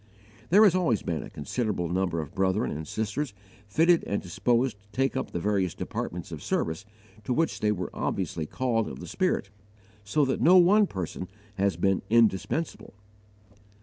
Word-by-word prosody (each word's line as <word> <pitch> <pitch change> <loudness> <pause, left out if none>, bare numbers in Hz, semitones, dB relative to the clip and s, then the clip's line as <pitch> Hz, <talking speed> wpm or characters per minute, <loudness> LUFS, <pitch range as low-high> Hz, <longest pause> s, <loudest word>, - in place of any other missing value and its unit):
There 205 +5 +7
has 200 -5 +6
always 165 - +1
been 80 -3 -2
a - - -9
considerable 95 - -2
number 90 -1 0
of 75 - -9
brethren 95 +4 +1
and 75 +1 -5
sisters 110 - -3 0.3
fitted 165 +10 +4
and 100 - -1
disposed 120 +5 0
to 105 - -30
take 135 +5 0
up 130 - -2
the - - -3
various 95 -2 0
departments 85 0 -5
of 80 -3 -6
service 80 +5 -2 0.4
to 115 - -4
which 165 0 0
they 105 - +2
were 90 -4 -3
obviously 85 -4 -2
called 115 -1 0
of - - -7
the - - -7
Spirit, 180 - -1 0.5
so 140 +9 +2
that 130 - -1
no 185 +2 +7
one 200 +4 +6
person 90 - -5 0.3
has 100 0 +1
been 95 -1 +2
indispensable. 115 - +1
105 Hz, 170 wpm, -27 LUFS, 90-135 Hz, 0.5 s, There